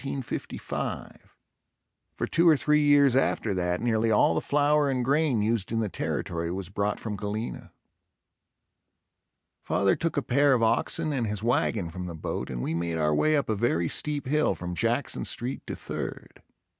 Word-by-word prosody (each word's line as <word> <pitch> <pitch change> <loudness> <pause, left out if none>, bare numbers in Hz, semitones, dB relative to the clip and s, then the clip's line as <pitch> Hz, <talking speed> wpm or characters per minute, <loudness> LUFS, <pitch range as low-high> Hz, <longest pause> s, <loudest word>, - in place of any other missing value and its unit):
For 135 - -5 2.2
two 170 +1 +3
or 155 - +5
three 150 +2 +3
years 145 -3 +5
after 130 - +1
that 90 0 -1
nearly 115 -1 +1
all 105 -6 +4
the 80 - 0
flour 145 0 +2
and 130 -2 0
grain 140 -5 +2
used 110 -2 0
in 115 - 0
the 110 -2 -1
territory 85 -2 -3
was 95 -1 -5
brought 100 +1 -1
from 110 -2 -4
Galena. 105 +3 -5 1.9
Father 100 -1 +2
took 165 -2 -2
a 145 - +1
pair 140 +2 +3
of 120 -3 +2
oxen 150 +7 +1
and 120 -5 -1
his 105 0 -4
wagon 110 -6 0
from 90 +1 -6
the 85 - -6
boat 80 - -4
and 60 -1 -4
we - - -2
made 85 0 -2
our 75 -1 +1
way 155 - +3
up 140 - -1
a 110 - 0
very 100 -6 +1
steep 145 - -1
hill 150 +4 +1
from 90 0 -5
Jackson 115 +8 0
Street 125 +3 -3
to - - -4
Third. - - -6
115 Hz, 170 wpm, -27 LUFS, 95-140 Hz, 2.2 s, or